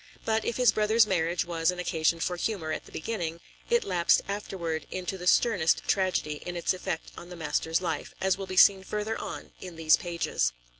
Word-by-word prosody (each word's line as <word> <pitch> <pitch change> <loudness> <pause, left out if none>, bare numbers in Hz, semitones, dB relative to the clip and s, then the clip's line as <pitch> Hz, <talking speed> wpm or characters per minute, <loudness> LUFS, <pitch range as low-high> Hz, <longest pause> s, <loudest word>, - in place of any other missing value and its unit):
But 220 0 +1
if 235 - -2
his 250 -1 +5
brother's 215 +1 +4
marriage 175 -3 0
was 165 -1 0
an 180 - -1
occasion 165 -2 0
for 180 +2 -1
humor 175 -4 -2
at - - -4
the - - -15
beginning, 170 -3 -4 0.3
it 475 -1 +3
lapsed 175 - +3
afterward 180 -5 -4
into 185 +1 -4
the 180 -1 -6
sternest 180 -6 +3
tragedy 185 -6 0
in 175 - -5
its 170 - +1
effect 175 -3 -4
on 175 - -10
the 180 - -8
master's 160 +1 -1
life, 165 -5 -3
as 190 -1 +2
will 195 0 -6
be 185 0 -5
seen 195 0 +7
further 210 +3 -3
on - - -7
in 180 -2 -8
these 160 -1 +4
pages. 170 - -1
180 Hz, 200 wpm, -28 LUFS, 165-200 Hz, 0.3 s, seen